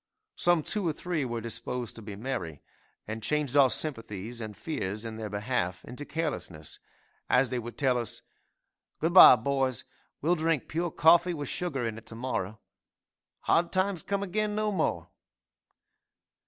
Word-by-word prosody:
Some 175 -3 +3
two 205 0 +1
or 160 - +1
three 165 -2 -2
were 120 -2 -3
disposed 115 +1 -3
to 115 - -9
be 105 -2 -7
merry, 105 - -5 0.4
and 110 +1 -5
changed 145 +3 0
our 140 -2 +7
sympathies 115 -4 -3
and 110 -2 -7
fears 105 -8 -4
in 110 -1 -6
their 110 -1 -5
behalf 100 -3 -2
into 145 +4 -7
carelessness, 135 - -3 0.5
as 125 0 +3
they 125 - -1
would 120 0 -8
tell 130 -3 +2
us, 115 - -5 0.8
"Good 165 +2 0
bye, 180 - +11
boys, 130 0 -1 0.4
we'll 165 +4 +2
drink 160 -4 0
pure 170 +2 -1
coffee 170 +3 +4
with 145 -3 -4
sugar 140 -9 -2
in 115 0 -5
it 115 - -21
to 115 - -7
morrow! 110 -4 -3 0.8
'hard 170 +1 +2
times 185 -2 0
come 200 +3 -2
again 210 +2 -1
no 215 0 0
more!'" 195 - -1
130 Hz, 160 wpm, -29 LUFS, 115-165 Hz, 0.8 s, bye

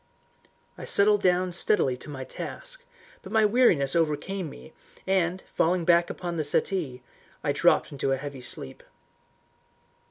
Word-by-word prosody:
I - - -7
settled 205 0 +4
down 180 0 +2
steadily 170 -7 +2
to 140 - -10
my 135 -2 -6
task, - - -8 0.4
but 190 - -11
my 220 -1 +4
weariness 200 - +3
overcame 165 +3 -1
me 60 - -13 0.3
and, 185 -1 0
falling 170 +1 +1
back 170 0 +4
upon 175 -2 -5
the 155 - 0
settee, 145 -4 -1 0.4
I - - +1
dropped - - +2
into 135 -1 -2
a 135 - +1
heavy 140 -1 -7
sleep. 95 - -6
170 Hz, 140 wpm, -26 LUFS, 140-195 Hz, 0.4 s, settled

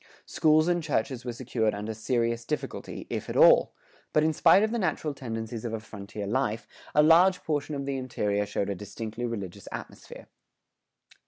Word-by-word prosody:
Schools 155 +1 +3
and 175 -1 +2
churches 130 -4 -2
were 120 - -3
secured 115 -3 -1
under 105 +2 -4
serious 115 +1 -1
difficulty,[107:1] 150 +5 -5
if - - -4
at - - -3
all; - - +6 0.4
but 155 - +4
in 160 0 +2
spite 195 +6 +5
of 220 - +1
the 235 - -1
natural 160 -6 -1
tendencies 115 -3 -5
of 115 -2 -4
a 115 - -2
frontier 105 -1 -8
life, 115 +1 -1 0.3
a 150 - +6
large 180 +4 +5
portion 150 -1 -2
of 140 -1 -4
the 140 -1 -2
interior 105 -5 -1
showed 100 0 -2
a - - 0
distinctly 110 +4 -5
religious 100 -4 -6
atmosphere. - - -9
120 Hz, 175 wpm, -27 LUFS, 110-150 Hz, 0.4 s, all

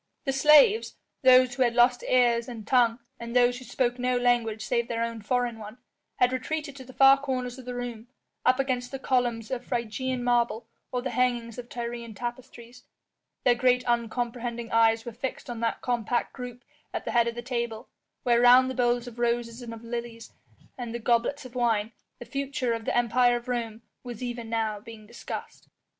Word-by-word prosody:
The 270 - 0
slaves 305 - +5 0.3
those 255 -2 +6
who 260 - -4
had 240 -2 +3
lost 245 0 +4
ears 240 -1 +3
and 225 -3 -8
tongue 235 -2 +3 0.2
and 235 0 -7
those 245 0 +4
who 255 - -12
spoke 245 -1 -1
no 250 0 +1
language 235 -3 +1
save 235 -1 0
their 230 0 -1
own 230 -1 -4
foreign 240 +1 -1
one 215 +2 -9 0.4
had 250 +1 +2
retreated 285 +2 -3
to 265 - -9
the 260 - -13
far 270 +1 +6
corners 255 -2 -3
of 255 - -11
the 250 0 -5
room, 240 -2 -6 0.4
up 255 +1 +3
against 255 -2 -1
the 270 - -5
columns 245 -3 -1
of 255 -2 -3
Phrygian 245 +2 -3
marble 235 -2 +1 0.2
or 250 -1 -2
the 260 - -3
hangings 240 -2 0
of 245 0 -9
Tyrian 235 -2 -6
tapestries; 240 +1 -8 0.6
their 245 - +5
great 250 +1 +2
uncomprehending 235 0 -2
eyes 225 0 +3
were 235 - -5
fixed 255 +1 -5
on 235 - -6
that 230 0 -1
compact 240 -1 -1
group 245 -1 -8 0.3
at - - -4
the - - -2
head 235 -1 +3
of 235 - -3
the 240 - -6
table, 235 -3 -3 0.4
where 240 -1 +3
round 250 +1 +7
the - - -4
bowls 245 -1 +1
of 240 -1 -10
roses 235 0 -1
and 235 -1 -7
of 230 0 -9
lilies 235 -1 -6 0.5
and 240 -1 -5
the - - -3
goblets 240 +4 0
of 250 - -11
wine, 230 -3 +1 0.3
the 240 - -9
future 265 -1 -2
of 225 -1 -5
the - - 0
Empire 240 +1 +3
of 240 0 -5
Rome 230 -2 -3 0.2
was 245 -1 -7
even 240 -2 -5
now 220 -2 -1
being 215 0 -12
discussed. 235 +3 -8
240 Hz, 195 wpm, -27 LUFS, 230-250 Hz, 0.6 s, round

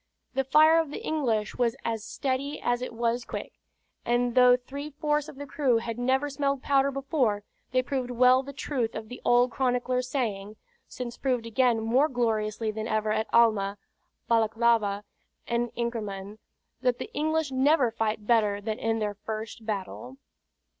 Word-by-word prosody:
The 270 0 +1
fire 310 +4 +6
of 325 -3 -1
the 295 - -7
English 235 -10 -1
was 235 -1 +2
as 225 -2 -2
steady 275 +4 -3
as 245 0 0
it 250 - -4
was 235 +1 -1
quick; - - -6 0.5
and 240 0 +1
though 250 0 +6
three 280 +4 -7
fourths 300 0 -1
of 305 - -11
the 285 +1 -7
crew 265 -3 +1
had 230 0 -4
never 265 +3 +1
smelled 275 -1 -1
powder 275 -1 +3
before, 270 -6 0 0.3
they 255 0 +2
proved 255 -1 -2
well 250 +1 +5
the 275 +1 -8
truth 255 -4 -2
of 220 0 -6
the 250 - -9
old 245 +1 +4
chronicler's 250 0 0
saying 215 -6 -2 0.3
(since 245 -1 -6
proved 250 -4 -1
again 235 0 +2
more 245 +7 +3
gloriously 220 -3 -1
than 215 +1 -4
ever 215 -1 0
at 220 +1 0
Alma, 210 -4 +3 0.5
Balaklava, 225 -2 +2 0.4
and 235 0 -1
Inkermann), 215 -4 -4 0.4
that 250 -1 +2
"the - - -7
English 315 -1 0
never 265 -1 +3
fight 220 -1 -2
better 210 -3 +3
than 215 +1 -4
in 225 0 0
their 210 -2 -1
first 220 +2 -7
battle." 220 +5 -5
240 Hz, 165 wpm, -27 LUFS, 220-265 Hz, 0.5 s, fire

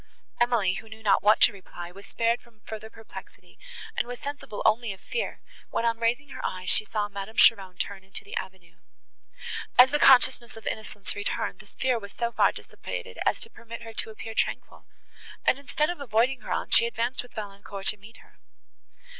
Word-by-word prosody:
Emily, 240 -6 +3
who 220 +4 -7
knew 220 0 -11
not 205 - +4
what 215 +2 +5
to - - +7
reply, 175 -3 -9
was 200 +2 -12
spared 230 +1 +1
from 230 -3 -24
further 220 0 -7
perplexity, 225 0 -12 0.4
and - - 0
was 245 0 -6
sensible 285 -7 -5
only 225 0 +3
of 190 - -14
fear, 480 - -3 0.3
when 230 - 0
on 230 -1 +1
raising 240 +5 +1
her - - -7
eyes, 185 0 -1
she - - +5
saw 210 -1 -1
Madame 200 +2 -7
Cheron 190 -5 +5
turn 195 0 -3
into 190 +1 -6
the 200 - -8
avenue. 185 -2 -6 1.0
As 250 +1 +9
the 295 - +2
consciousness 250 -4 +6
of 220 - -11
innocence 210 -2 -5
returned, 205 -2 -2
this 205 -1 -15
fear 255 -3 +1
was 200 -1 -9
so 235 -1 -1
far - - +4
dissipated - - -7
as - - +2
to - - -5
permit 230 0 -9
her 225 -1 -8
to - - -3
appear 220 +1 -7
tranquil, - - -2 0.6
and, 265 - +4
instead 300 +3 0
of 350 - -7
avoiding 250 +1 +2
her - - -7
aunt, - - -1
she 230 - +7
advanced 235 +2 -1
with 245 - -15
Valancourt 200 -2 -7
to 210 - +2
meet 210 +3 -14
her. - - -21
220 Hz, 195 wpm, -27 LUFS, 200-240 Hz, 1.0 s, As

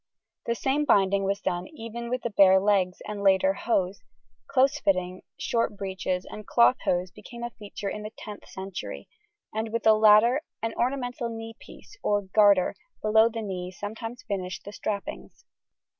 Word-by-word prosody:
The 235 - +1
same 275 +5 0
binding 200 -6 +3
was 200 +1 -1
done 180 -1 -2
even 235 -5 -7
with 250 0 -2
the 235 - -2
bare 190 -1 +6
legs 190 -2 +1
and 210 -1 -5
later 190 -1 +4
hose: 195 -3 -1 0.5
close 275 +2 +3
fitting 185 -5 0 0.2
short 230 -3 -1
breeches 190 -2 -3
and 215 -1 -9
cloth 245 +2 +5
hose 180 0 0
became 235 +6 -10
a 240 - -4
feature 205 -2 -8
in 210 - -4
the 210 - -6
10th 210 -1 -10
century, 190 -1 -7 0.5
and 220 +1 -3
with 230 - -2
the 220 - +7
latter 215 +5 +6 0.2
an 225 0 -1
ornamental 245 -1 -2
knee 225 0 -7
piece 420 - -15
or 205 -1 +1
garter 200 -1 +4 0.3
below 220 +1 +5
the 225 -1 -5
knee 180 -3 -4
sometimes 225 +5 -7
finished 185 -3 -4
the 205 - -8
strappings. 205 -1 -5
210 Hz, 165 wpm, -27 LUFS, 195-235 Hz, 0.5 s, the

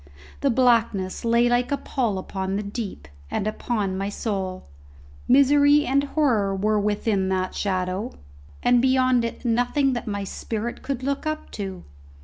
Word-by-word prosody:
The 280 - +1
blackness 230 -7 +2
lay 235 +1 +3
like 245 +1 +1
a 280 - +1
pall 235 -9 -1
upon 190 0 -3
the 205 - -2
deep, 200 - -6 0.2
and 195 - -2
upon 215 -2 -2
my 195 +1 -2
soul. 195 -4 -4 0.6
Misery 285 +2 +5
and 275 +2 +2
horror 245 -10 +1
were 210 +2 +1
within 205 -1 0
that 185 0 -1
shadow, 190 +3 -2 0.5
and 245 -1 +4
beyond 255 -1 +3
it 230 +2 -5
nothing 245 +4 +2
that 240 -2 -4
my 205 -1 -2
spirit 225 +4 -4
could 265 -2 -4
look 280 +3 -2
up 310 0 -4
to! 190 -3 -6
230 Hz, 150 wpm, -24 LUFS, 195-255 Hz, 0.6 s, Misery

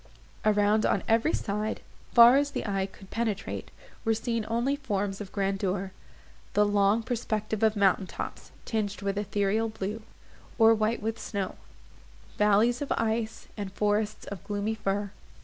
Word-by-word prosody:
Around, 210 0 +3
on - - +1
every 230 +7 +3
side, 210 +1 -2 0.3
far 235 +2 +9
as 285 +1 +3
the - - -4
eye 195 -2 0
could 195 0 -16
penetrate, 220 -3 -3 0.3
were 225 -2 +2
seen 230 -1 -2
only 240 +5 +1
forms 205 -7 -2
of 195 - -7
grandeur—the 195 +1 -2
long 205 +2 +3
perspective 220 -3 -2
of 220 -1 +3
mountain 195 -1 +3
tops, - - -7 0.2
tinged 210 -3 -2
with 200 0 -1
ethereal 205 +2 0
blue, 215 +1 -4 0.6
or 225 -1 +7
white 220 0 0
with 225 +1 -2
snow; 200 -3 -3 0.9
valleys 210 +4 +4
of 285 - -3
ice, 225 0 -2
and 200 -3 -5
forests 210 +1 0
of 200 -4 -7
gloomy 205 +1 -2
fir. 205 -2 -2
210 Hz, 145 wpm, -28 LUFS, 200-225 Hz, 0.9 s, far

